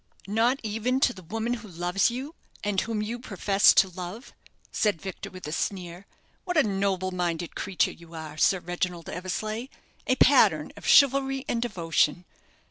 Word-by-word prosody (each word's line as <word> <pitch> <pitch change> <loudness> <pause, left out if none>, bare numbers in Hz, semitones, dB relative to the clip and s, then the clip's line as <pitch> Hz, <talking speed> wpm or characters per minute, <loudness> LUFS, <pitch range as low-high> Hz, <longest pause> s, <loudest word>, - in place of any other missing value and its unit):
"Not 230 +6 +2
even 225 +4 -1
to 250 - +4
the 185 - -12
woman 225 +7 -3
who 220 - -11
loves 180 +3 +1
you, 260 +6 -6 0.3
and 205 -2 +1
whom 220 -2 -2
you 235 +3 -4
profess 200 -3 +3
to 195 - +6
love?" 185 +6 -8 0.4
said 205 -6 +1
Victor, 190 +2 -7
with 185 0 -10
a - - -5
sneer. 180 +2 -4 0.4
"What 360 -2 -2
a 310 - +6
noble 195 -2 -1
minded 175 -2 -2
creature 190 - 0
you 170 0 -14
are, 155 -2 -7
Sir 190 +4 +3
Reginald 175 -1 -4
Eversleigh 215 +6 -4 0.4
a 255 - +3
pattern 210 - +4
of - - -9
chivalry 270 -1 +4
and 230 - -1
devotion! 175 -6 0
195 Hz, 165 wpm, -27 LUFS, 175-235 Hz, 0.4 s, to